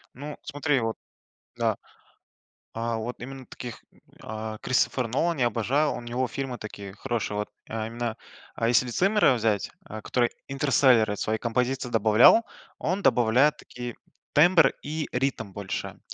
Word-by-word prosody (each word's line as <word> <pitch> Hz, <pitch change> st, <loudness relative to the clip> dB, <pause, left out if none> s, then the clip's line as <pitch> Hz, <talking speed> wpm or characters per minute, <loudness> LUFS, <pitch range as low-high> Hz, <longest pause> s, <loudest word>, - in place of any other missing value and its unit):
Ну, 145 Hz, +3 st, -7 dB
смотри, 145 Hz, -1 st, 0 dB
вот, 115 Hz, -1 st, -1 dB, 0.6 s
да, -, -, 0 dB, 1.0 s
а, 115 Hz, 0 st, -2 dB
вот 115 Hz, +3 st, -5 dB
именно 130 Hz, +1 st, -8 dB
таких, 120 Hz, -2 st, -8 dB, 0.4 s
а, 110 Hz, 0 st, -6 dB
Кристофер 130 Hz, -1 st, +1 dB
Нолан 160 Hz, +6 st, 0 dB
я 120 Hz, -, +4 dB
обожаю. 135 Hz, +6 st, +1 dB
У -, -, -6 dB
него 125 Hz, +2 st, -2 dB
фильмы 130 Hz, -4 st, -4 dB
такие 100 Hz, -2 st, -8 dB
хорошие, 115 Hz, -2 st, -3 dB
вот, 105 Hz, -, -3 dB, 0.2 s
а, 110 Hz, 0 st, -3 dB
именно, 115 Hz, -1 st, -3 dB, 0.4 s
а 115 Hz, -, 0 dB
если 120 Hz, +1 st, +3 dB
Циммера 195 Hz, -, +3 dB
взять, 110 Hz, -4 st, 0 dB
а, 110 Hz, -9 st, -7 dB
который 120 Hz, -2 st, +1 dB, 0.2 s
Интерселлера 130 Hz, -6 st, +3 dB
свои 110 Hz, +2 st, -1 dB
композиции 125 Hz, +2 st, -1 dB
добавлял, 115 Hz, -, +6 dB, 0.3 s
он 185 Hz, +5 st, -1 dB
добавляет 125 Hz, +4 st, +4 dB
такие 120 Hz, -1 st, -8 dB, 0.4 s
тембр 160 Hz, -2 st, +6 dB
и 155 Hz, +1 st, -3 dB
ритм 125 Hz, -5 st, -1 dB
больше. 100 Hz, 0 st, -5 dB
120 Hz, 140 wpm, -26 LUFS, 110-135 Hz, 1.0 s, добавлял